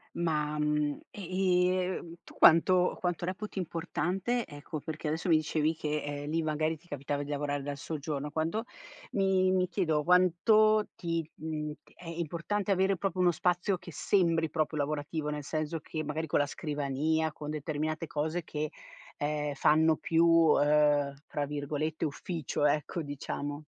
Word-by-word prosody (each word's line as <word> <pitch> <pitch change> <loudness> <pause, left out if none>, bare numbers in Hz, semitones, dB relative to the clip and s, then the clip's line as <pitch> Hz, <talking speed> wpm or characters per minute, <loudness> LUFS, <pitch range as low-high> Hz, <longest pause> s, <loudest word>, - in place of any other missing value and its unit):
Ma, 150 -3 0
mhmm, 150 -1 0
e, 185 -1 +1 0.3
ehm, 170 0 -8
tu - - -15
quanto 180 +2 +5
quanto 175 -1 -1
reputi 190 +2 -4
importante, 185 +7 -1
ecco 145 +1 -7
perché 155 +1 -5
adesso 160 +4 -1
mi 165 - +6
dicevi 155 +1 +1
che, 150 -1 -2
ehm, 145 +1 -4
lì 165 +1 +1
magari 155 +1 0
ti 165 - -25
capitava 145 -1 -3
di 145 - -6
lavorare 145 -1 -1
dal 140 0 -4
soggiorno, 150 -1 -4
quando 160 +8 -1 0.5
mi 190 -2 +3
mi 185 -1 +2
chiedo, 160 -5 0
quanto 210 +5 +4
ti, 165 -2 -2
mhmm, 155 -1 -4 0.2
è 180 - -15
importante 170 +5 -2
avere 190 0 +2
proprio 185 0 -1
uno 180 - +5
spazio 180 +3 +1
che 175 0 -11
sembri 165 -2 +2
proprio 155 0 -1
lavorativo, 150 +1 -2
nel 150 -1 -4
senso 155 +2 -2
che 155 +1 -5
magari 155 +2 -3
con 150 - +1
la 145 - +2
scrivania, 150 +2 -1
con 150 0 -6
determinate 155 +1 -3
cose 155 +4 -2
che, 150 -1 -4 0.5
ehm, 150 0 -1
fanno 155 +2 +4
più, 165 +2 +2
uhm, 150 -3 +4
tra 145 -1 -2
virgolette 150 +2 -3
"ufficio" 155 -1 -2
ecco, 150 +3 0
diciamo. 145 +1 -5
155 Hz, 155 wpm, -30 LUFS, 150-175 Hz, 0.5 s, mi